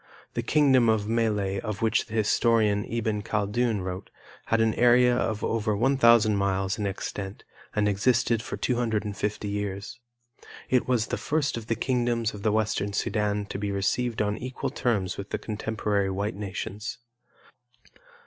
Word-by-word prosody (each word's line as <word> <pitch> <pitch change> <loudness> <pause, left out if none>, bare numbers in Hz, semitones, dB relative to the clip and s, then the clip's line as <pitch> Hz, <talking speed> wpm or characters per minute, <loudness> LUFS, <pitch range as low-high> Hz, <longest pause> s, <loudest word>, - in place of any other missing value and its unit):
The - - -1
kingdom 135 -6 +4
of 110 -2 +1
Melle 105 -4 0
of 110 -1 -4
which 110 - +2
the 115 - -7
historian, 110 -1 +2
Iben 110 -2 -2
Khaldun, 105 +1 0
wrote, 90 +1 -5 0.4
had 115 - +2
an 110 -1 +3
area 125 0 +5
of 110 -3 -1
over 110 -2 0
1,000 115 -3 +5
miles 100 +1 0
in 105 - 0
extent 95 0 -5 0.3
and 105 -1 +2
existed 115 +3 +2
for - - -6
250 105 -4 -1
years. 100 +1 -4 0.7
It 125 -1 +3
was 120 -3 +2
the - - -3
first 150 -1 0
of 115 -2 -6
the 115 - 0
kingdoms 120 -3 0
of 105 - -8
the 110 - +1
Western 105 -2 0
Sudan 105 0 0
to 95 - -6
be 100 0 -2
received 110 +4 0
on 105 0 -2
equal 130 +1 -4
terms 110 -9 -1
with 100 - -6
the - - -1
contemporary 105 -2 -1
white 100 +2 -2
nations. 105 +3 -5
110 Hz, 155 wpm, -27 LUFS, 100-115 Hz, 0.7 s, area